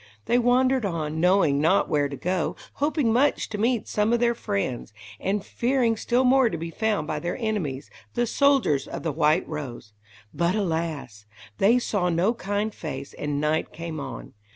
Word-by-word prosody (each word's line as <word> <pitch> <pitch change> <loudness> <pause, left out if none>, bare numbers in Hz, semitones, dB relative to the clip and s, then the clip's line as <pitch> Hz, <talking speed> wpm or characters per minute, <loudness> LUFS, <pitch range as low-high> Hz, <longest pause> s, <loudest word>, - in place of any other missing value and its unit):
They 240 - +3
wandered 255 +1 +3
on, 160 -5 -2
knowing 170 -5 +3
not 165 +6 +3
where 145 -2 +1
to 140 - -5
go, 180 +1 -1 0.3
hoping 290 -6 +2
much 280 +5 +2
to 210 - -5
meet 235 +1 +1
some 210 +1 +1
of 240 - +2
their 235 0 +3
friends, 195 - -3 0.3
and 200 +1 -1
fearing 240 -2 +1
still 240 +3 +1
more 260 -1 +4
to 170 - -4
be 165 +1 -5
found 220 -2 0
by 155 0 -3
their 175 +3 -3
enemies, 185 - -3 0.2
the 240 - +2
soldiers 265 - +2
of - - -6
the 165 - -1
White 155 +2 +2
Rose. 125 -8 -7 0.4
But, 170 +5 +1
alas! 160 - -3 0.3
they 225 +5 +5
saw 205 -7 0
no 175 +7 +2
kind 205 -1 -2
face, 140 -3 -6
and 145 -1 -3
night 155 +1 0
came 165 -1 -6
on. 135 -4 -7
185 Hz, 175 wpm, -25 LUFS, 150-235 Hz, 0.4 s, they